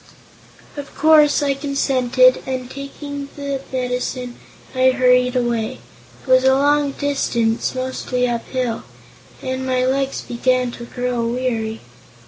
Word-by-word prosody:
Of 285 0 -8
course 300 -1 +5
I 280 -1 +2
consented 260 -2 +2
and, 255 -1 -4
taking 280 0 -7
the 280 -2 -4
medicine, 250 -1 -3 0.4
I 260 0 +4
hurried 250 -1 +3
away. 240 0 -1 0.5
It - - -19
was 255 0 +5
a 265 0 +5
long 285 0 +2
distance, 240 -6 0
mostly 255 -1 -1
up 235 -1 -3
hill, 250 -3 -2 0.6
and 260 0 -3
my 255 -1 +1
legs 270 +1 0
began 250 +1 0
to 235 - -9
grow 245 -1 -2
weary. 230 -2 -2
255 Hz, 125 wpm, -20 LUFS, 250-275 Hz, 0.6 s, course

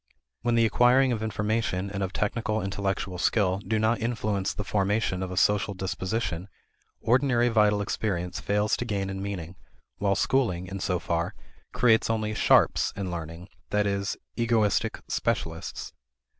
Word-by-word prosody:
When 120 0 +1
the 115 -1 +4
acquiring 125 +4 +4
of 115 -3 -1
information 105 -3 -1
and 100 -1 -3
of 95 -1 -1
technical 110 +2 -1
intellectual 95 -2 -2
skill 95 -1 +2
do 110 +2 -1
not 110 +2 +2
influence 105 -4 -1
the 105 - -4
formation 100 -1 0
of 95 - -3
a 90 - -6
social 105 0 +2
disposition, 95 -1 -3 0.5
ordinary 120 0 +3
vital 105 -2 +3
experience 90 -4 -2
fails 105 +1 +1
to 120 - -3
gain 100 -3 -2
in 95 0 -5
meaning, 90 -3 -5 0.4
while 100 -1 +2
schooling, 100 -7 +1
in 95 +1 -6
so 90 -1 0
far, 85 0 -2 0.4
creates 115 -3 +3
only 110 -1 0
"sharps" - - +4
in 95 -2 -3
learning 85 +1 -6 0.2
that 105 0 +1
is, 100 0 -1 0.2
egoistic 115 -4 +1
specialists. - - -3
100 Hz, 150 wpm, -27 LUFS, 95-110 Hz, 0.5 s, the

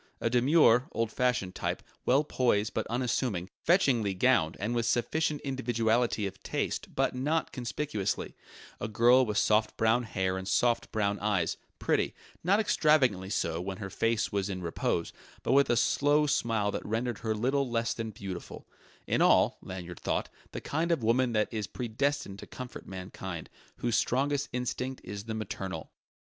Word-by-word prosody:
A 115 - 0
demure, 125 -1 +5
old 115 -1 -1
fashioned 125 -8 0
type; - - -3 0.2
well 135 +4 +4
poised 120 -7 +1
but - - -2
unassuming; 115 -6 -1
fetchingly 125 - +3
gowned 95 -6 +3
and 110 +4 -1
with 120 -1 0
sufficient 150 +6 0
individuality 120 -4 0
of 95 - -6
taste - - -3
but - - +1
not 150 +5 0
conspicuously; 120 -3 -3 0.5
a - - -3
girl 120 +4 +5
with 105 -4 -2
soft 110 +2 +2
brown 115 +2 +3
hair 95 -5 -1
and 95 - -7
soft 120 +2 +1
brown 100 -1 0
eyes; 100 -5 0 0.2
pretty, - - 0 0.3
not 195 +5 +4
extravagantly 140 - +3
so 85 -5 -1
when 95 +1 -4
her 95 -1 -6
face 115 -1 0
was 100 -1 -1
in 95 -2 -4
repose, 85 0 -1 0.3
but - - 0
with 140 +1 +5
a 120 - +3
slow 145 +4 +3
smile 115 -7 +1
that - - -4
rendered 115 +1 -2
her 110 -1 -1
little 130 +4 +1
less 115 -1 0
than 115 -1 -4
beautiful: 95 -4 -7 0.4
in - - +1
all - - +4
(Lanyard 90 -2 -7
thought) - - -1 0.2
the - - -5
kind 165 +3 -1
of 160 -8 +1
woman 120 +2 +2
that 105 -1 +2
is 105 -2 -2
predestined 125 -3 -2
to - - -9
comfort 125 -1 -8
mankind, 95 -2 -7 0.2
whose 120 -2 -1
strongest 140 +4 +1
instinct 125 +1 -3
is 100 0 -7
the 110 -1 -4
maternal. 95 -3 -5
115 Hz, 165 wpm, -30 LUFS, 100-130 Hz, 0.5 s, demure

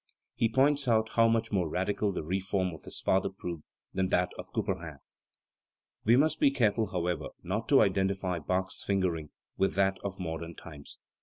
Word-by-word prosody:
He 115 - +1
points 140 +3 +2
out 110 -2 +3
how 115 +1 +4
much 115 0 +1
more 90 -6 +1
radical 100 +4 0
the 90 - -4
reform 95 +1 -1
of 80 - -12
his - - -5
father 95 - +2
proved 85 -4 -6 0.3
than 95 -1 0
that 90 -1 +2
of - - -9
Couperin. 85 -6 -3 1.1
We 115 +3 +6
must 155 +3 +3
be - - +6
careful, 115 -4 +1
however, 90 -4 -2 0.2
not 105 +6 -3
to 140 - +7
identify 95 -2 0
Bach's 95 +4 -2
fingering 90 -6 0 0.3
with 95 - +1
that 95 0 +2
of 100 -1 -5
modern 85 -1 -5
times. 75 -3 -10
95 Hz, 170 wpm, -30 LUFS, 90-110 Hz, 1.1 s, to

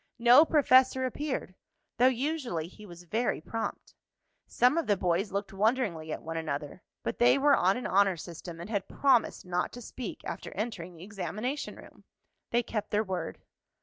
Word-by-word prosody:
No 240 +6 +7
professor 260 -4 +4
appeared, 260 -6 -3 0.5
though 250 - +7
usually 260 - -1
he 210 +4 -13
was 175 -1 -11
very 220 +7 -1
prompt. 225 0 -5 0.5
Some 250 +4 +3
of 330 - -3
the 205 -2 +3
boys 180 +3 0
looked 200 0 -3
wonderingly 195 -7 0
at - - -5
one 165 0 -4
another, 155 +1 -4 0.2
but - - -3
they 240 - +6
were 280 0 +5
on 190 +4 +3
an 250 - -5
honor 195 -2 +3
system, 170 0 -8
and 170 - -7
had 200 -3 -1
promised 265 -8 +2
not 180 0 -1
to 245 - -8
speak 245 0 -7
after - - -6
entering 185 -5 -4
the 165 - -11
examination 215 +7 -4
room. - - -15 0.5
They 240 +1 +2
kept 215 -2 -4
their 210 +1 +1
word. 185 -5 -4
210 Hz, 175 wpm, -29 LUFS, 180-250 Hz, 0.5 s, No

